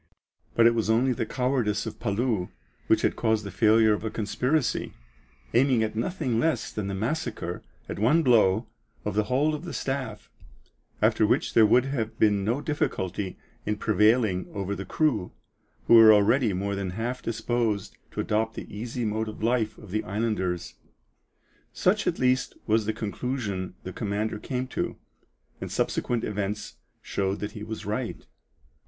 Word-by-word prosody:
But 115 - +5
it 115 - +6
was 115 -2 -1
only 125 +4 +3
the 115 -1 -3
cowardice 125 -5 0
of 110 -1 -6
Palou 105 -3 0 0.4
which - - +3
had - - +2
caused 110 -1 +1
the 100 - -6
failure 110 +2 +4
of 105 - -3
a 110 - -1
conspiracy, 125 +7 -1 0.6
aiming 125 -2 +4
at 110 0 -3
nothing 125 -1 -1
less 150 -5 0
than 105 -2 -3
the 100 - -3
massacre, 110 - -3 0.3
at - - -5
one 145 +10 +4
blow, 110 -4 +4 0.4
of 105 - -1
the 105 +1 +1
whole 140 +7 +2
of 150 +1 -4
the 175 - -6
staff, 135 -6 -4 0.7
after - - +4
which - - +1
there 110 -2 +6
would 125 +4 +4
have 120 -5 -3
been 105 -2 +3
no 120 +8 0
difficulty 95 - -2 0.3
in 105 0 -1
prevailing 105 -2 +2
over 100 0 -2
the 100 -1 -5
crew, 120 - 0 0.5
who - - +4
were 115 -1 +10
already 110 +3 +4
more 100 +2 -2
than 100 -1 -2
half 120 +3 -2
disposed 115 -2 -1
to - - -3
adopt 110 +1 0
the - - -8
easy 115 +2 -3
mode 110 +1 -1
of 110 - -8
life 115 -2 +1
of 105 -4 -12
the 110 +2 -1
islanders. 95 -4 -2 1.0
Such - - +1
at - - +1
least 125 0 +1
was 110 -1 +2
the - - +2
conclusion 105 -5 -3
the 95 - -6
commander 105 +1 -2
came 130 +1 -3
to, - - -3 0.6
and - - -5
subsequent 120 -2 0
events 105 0 -3 0.3
showed 95 0 -1
that 105 0 -3
he 105 - -9
was 110 +1 -6
right. 110 +4 -3
110 Hz, 165 wpm, -27 LUFS, 105-125 Hz, 1.0 s, were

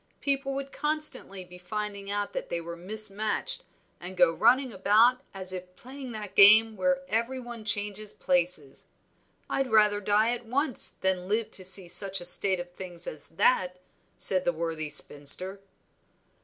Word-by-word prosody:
People 275 -1 -2
would 275 0 -7
constantly 300 -11 0
be 180 0 -15
finding 200 +1 -7
out 205 0 -4
that - - -7
they 170 - -4
were 170 0 -9
mismatched, 210 +3 -3 0.3
and 185 +1 -9
go 175 -2 +3
running 245 +5 +1
about 220 +6 +2
as 190 -1 -5
if 180 0 -10
playing 260 +3 -11
that 210 -3 -8
game 215 +3 +6
where 180 -2 -1
every 230 +6 -3
one 240 -2 -11
changes 210 -1 -2
places. 175 -6 -2 0.6
I'd 270 -1 -3
rather 210 -2 +3
die 210 +3 0
at 245 0 -6
once 265 0 +2
than 185 -1 -2
live 215 +2 -2
to 190 - -8
see 185 0 +3
such 195 +2 +2
a 175 - -5
state 185 +1 +5
of 175 0 -9
things 175 -2 -6
as 155 - -6
that," 180 0 0 0.4
said 185 -1 +6
the - - 0
worthy 160 -2 -5
spinster. 150 +6 +4
200 Hz, 160 wpm, -26 LUFS, 180-225 Hz, 0.6 s, game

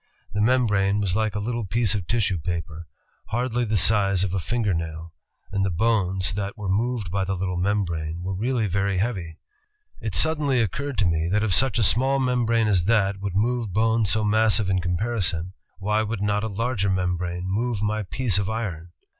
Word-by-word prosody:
The 100 - 0
membrane 105 -4 +2
was 100 -3 0
like 110 -1 0
a - - -1
little 115 +2 -2
piece 110 0 +2
of 100 -5 -3
tissue 100 -6 0
paper, 85 0 -4 0.4
hardly 120 +1 -1
the 110 -1 0
size 100 -2 +3
of 95 -2 -2
a 95 - 0
finger 110 +1 -1
nail, 80 0 -5 0.4
and 100 -1 0
the 95 - +1
bones 95 -2 +1
that 100 +3 -4
were 105 -2 -5
moved 105 -1 -1
by 100 0 0
the 95 0 -2
little 90 0 -2
membrane 85 -4 -1
were 95 +1 -3
really 115 +4 0
very 100 0 0
heavy. 90 -6 -2 0.6
It 110 -5 -3
suddenly 150 - +2
occurred 130 +6 -2
to 100 - +2
me, 85 -1 +1
that 105 +3 +1
if 105 -4 +1
such 130 +5 +3
a 115 - +2
small 130 +7 +3
membrane 120 -4 +1
as 95 -5 +2
that 100 -3 +2
would 100 -2 -4
move 115 -1 0
bones 110 0 +2
so 110 +2 +1
massive 110 -2 +3
in 95 - +2
comparison, 90 -2 -1 0.2
why 105 +2 0
would 110 -1 -3
not 105 0 0
a - - -1
larger 110 -1 -1
membrane 90 -1 -1
move 105 +2 -1
my 105 +1 0
piece 100 +2 0
of 100 0 -2
iron? 95 -7 -4
100 Hz, 195 wpm, -24 LUFS, 90-115 Hz, 0.6 s, size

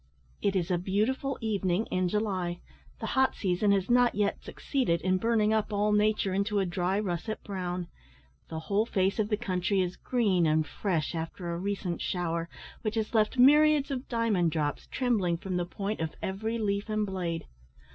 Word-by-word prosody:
It 200 -1 +1
is 185 -1 0
a 175 - +2
beautiful 220 +9 0
evening 200 -2 0
in 185 -1 +1
July. 185 -4 -1 0.4
The - - -4
hot 265 0 +3
season 195 +1 +1
has 195 -2 +2
not 245 0 +4
yet 205 0 0
succeeded 245 - -1
in 185 0 +2
burning 220 -1 +2
up 215 0 0
all 210 +1 +1
nature 210 -2 +2
into 200 +2 0
a 195 - +2
dry 180 +2 0
russet 205 +2 -3
brown. 180 -3 -4 0.6
The 160 0 -4
whole 205 +6 0
face 190 +1 +1
of 210 -1 +1
the 210 - +1
country 195 -2 0
is 180 -1 0
green 200 -9 +2
and 155 0 +2
fresh 170 -1 -2
after 170 +2 -4
a - - -3
recent 190 -2 -3
shower, 170 -2 -2 0.3
which 215 0 -2
has 220 0 -2
left 215 +2 +2
myriads 295 +2 +6
of 260 -1 -4
diamond 225 -8 +2
drops 150 -2 -2
trembling 210 -10 +1
from 185 +1 -3
the 175 -1 -1
point 200 +3 -3
of 160 -1 -3
every 220 +4 -2
leaf 205 -1 -1
and 215 0 0
blade. 175 -4 -3
200 Hz, 180 wpm, -29 LUFS, 180-220 Hz, 0.6 s, myriads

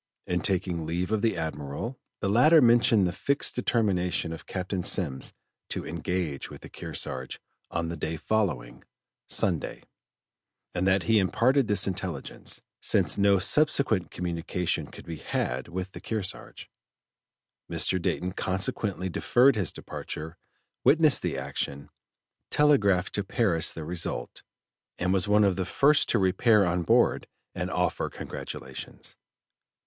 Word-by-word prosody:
In 90 -1 0
taking 90 -3 0
leave 90 +4 -2
of 110 -2 +1
the 115 -5 +1
Admiral, 80 - -4 0.2
the 100 - 0
latter 150 +11 +6
mentioned 120 -5 +5
the 90 - 0
fixed 140 +8 +1
determination 95 -8 0
of 80 - -10
Captain 95 0 -3
Semmes 75 -9 -1 0.4
to - - -3
engage 85 -6 -3
with - - -11
the - - -10
Kearsarge 65 0 -5 0.3
on 85 -1 -2
the 85 - -4
day 80 +1 -3
following 75 - -1 0.5
(Sunday), - - 0 0.9
and 90 +1 0
that 95 -1 +3
he 110 +5 +4
imparted 125 +7 +2
this 100 -2 +2
intelligence, 90 -6 -4 0.2
since - - +3
no 100 0 +5
subsequent 130 - +3
communication 85 0 -2
could - - -12
be 80 -1 -6
had 65 -2 -2
with 90 +2 -5
the - - -10
Kearsarge. 105 -4 -5 1.0
Mr. 95 - +2
Dayton 90 +1 -1
consequently 95 0 -2
deferred 125 +8 +3
his 100 -7 -1
departure, 80 +2 -7 0.5
witnessed 155 -1 +5
the - - -2
action, 70 0 -3 0.6
telegraphed 100 -11 +3
to 100 - -1
Paris 95 -6 +1
the 80 - -7
result, 85 +1 -4 0.6
and 90 +1 0
was 95 +1 +2
one 105 +1 +4
of 100 -2 +2
the 95 - 0
first 145 +10 +3
to - - +3
repair 100 +2 +4
on 90 0 0
board 85 - +3 0.3
and - - -3
offer - - 0
congratulations. - - -8
95 Hz, 135 wpm, -27 LUFS, 85-110 Hz, 1.0 s, latter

